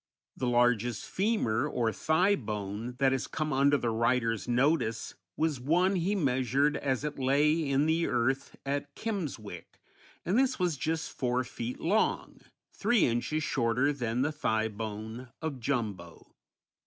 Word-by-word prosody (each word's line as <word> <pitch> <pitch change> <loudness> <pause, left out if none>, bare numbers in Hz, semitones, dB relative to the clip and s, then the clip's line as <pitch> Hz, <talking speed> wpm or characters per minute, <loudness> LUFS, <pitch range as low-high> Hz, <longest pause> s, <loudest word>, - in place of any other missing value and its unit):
The 125 - -2
largest 120 -2 +2
femur, 165 - 0
or 120 -6 0
thigh 180 +6 +2
bone, 105 - -4
that 135 0 +3
has 135 -1 -1
come 155 -2 -2
under 140 +2 +4
the 120 -3 -1
writer's 115 0 +1
notice 125 -2 +1 0.2
was 155 -4 0
one 175 +9 +2
he 185 +3 0
measured 135 - +1
as 135 -1 -1
it 150 -2 -4
lay 145 +3 +2
in 140 +2 +2
the 165 +1 +2
earth 130 +2 0
at 140 +1 -3
Kimmswick, 145 - -5 0.5
and 195 +8 +2
this 265 -1 +2
was 180 -4 +1
just 160 +3 -2
four 125 -1 0
feet 120 0 -6
long, 205 +6 0 0.3
three 240 -4 +3
inches 125 +6 -1
shorter 125 +1 +1
than 125 -2 -1
the 150 - 0
thigh 110 -7 0
bone 110 +3 -6
of 155 -5 -4
Jumbo. 105 -10 -4
135 Hz, 145 wpm, -30 LUFS, 115-155 Hz, 0.5 s, under